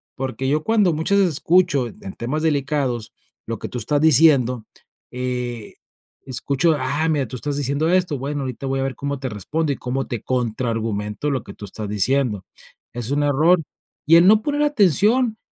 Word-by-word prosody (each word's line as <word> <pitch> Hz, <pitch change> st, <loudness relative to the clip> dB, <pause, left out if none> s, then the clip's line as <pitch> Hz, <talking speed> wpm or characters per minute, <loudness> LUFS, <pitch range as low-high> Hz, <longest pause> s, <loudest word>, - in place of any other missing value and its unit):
porque 130 Hz, 0 st, -3 dB
yo 155 Hz, +2 st, +1 dB
cuando 210 Hz, -5 st, +2 dB
muchas 160 Hz, +6 st, +1 dB
veces 185 Hz, -5 st, +2 dB
escucho 165 Hz, -8 st, +2 dB
en 95 Hz, -3 st, -10 dB
temas 150 Hz, +7 st, -3 dB
delicados 140 Hz, -6 st, -1 dB, 0.3 s
lo 115 Hz, -, -3 dB
que -, -, -6 dB
tú 125 Hz, -, -5 dB
estás 145 Hz, +7 st, 0 dB
diciendo, 135 Hz, -6 st, +4 dB, 0.5 s
eh, 125 Hz, -3 st, -4 dB, 0.5 s
escucho, 140 Hz, +5 st, 0 dB
ah, 145 Hz, +5 st, -1 dB
mira, 145 Hz, -5 st, 0 dB
tú 125 Hz, -, -7 dB
estás 145 Hz, +3 st, -3 dB
diciendo 145 Hz, +3 st, 0 dB
esto, 180 Hz, -5 st, +1 dB
bueno, 140 Hz, +2 st, -3 dB
ahorita 130 Hz, 0 st, -5 dB
voy 135 Hz, 0 st, -1 dB
a -, -, 0 dB
ver 135 Hz, -2 st, -3 dB
cómo 140 Hz, +2 st, -4 dB
te 130 Hz, -1 st, -4 dB
respondo, 145 Hz, -, -2 dB
y -, -, -8 dB
cómo 130 Hz, +2 st, -3 dB
te 120 Hz, -5 st, -5 dB
contraargumento 115 Hz, -1 st, -2 dB
lo 130 Hz, -5 st, -2 dB
que 100 Hz, -, -10 dB
tú 105 Hz, -, -10 dB
estás 105 Hz, +1 st, -7 dB
diciendo. 105 Hz, 0 st, 0 dB, 0.5 s
Es 120 Hz, +2 st, -4 dB
un 145 Hz, +1 st, +1 dB
error, 160 Hz, +5 st, +3 dB, 0.5 s
y 165 Hz, -, +7 dB
el 175 Hz, -, +6 dB
no 215 Hz, +2 st, +6 dB
poner 290 Hz, +3 st, 0 dB
atención, 220 Hz, -, +2 dB
140 Hz, 180 wpm, -21 LUFS, 125-160 Hz, 0.5 s, y